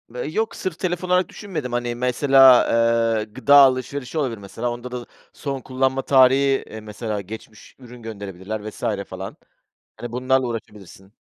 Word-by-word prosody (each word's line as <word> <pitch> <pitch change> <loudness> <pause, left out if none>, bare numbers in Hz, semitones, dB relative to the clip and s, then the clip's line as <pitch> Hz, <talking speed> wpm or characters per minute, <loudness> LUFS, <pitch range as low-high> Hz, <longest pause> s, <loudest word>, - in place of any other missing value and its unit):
Eee, 125 - -4
yok, 220 +6 -1
sırf 180 -2 -5
telefon 180 0 -2
olarak 180 -1 +2
düşünmedim. 165 - -6
Hani, 120 0 -2
mesela, 130 +1 +5 0.5
eee, 105 - -1
gıda 130 +6 +2
alışverişi 135 0 +3
olabilir 130 -7 -1
mesela. 105 +4 -5
Onda 120 +1 -7
da 125 -1 -6 0.3
son 135 -3 -5
kullanma 130 +1 -1
tarihi, 135 +1 +4
eee, 110 - -8
mesela 105 0 -5
geçmiş 110 +2 -11
ürün 125 -1 -13
gönderebilirler 105 -1 -6
vs. - - -14 0.2
falan. 95 +1 -8 0.6
Hani, 120 -1 -7
bunlarla 130 +1 +1
uğraşabilirsin. 105 -4 -9
125 Hz, 150 wpm, -22 LUFS, 110-135 Hz, 0.6 s, mesela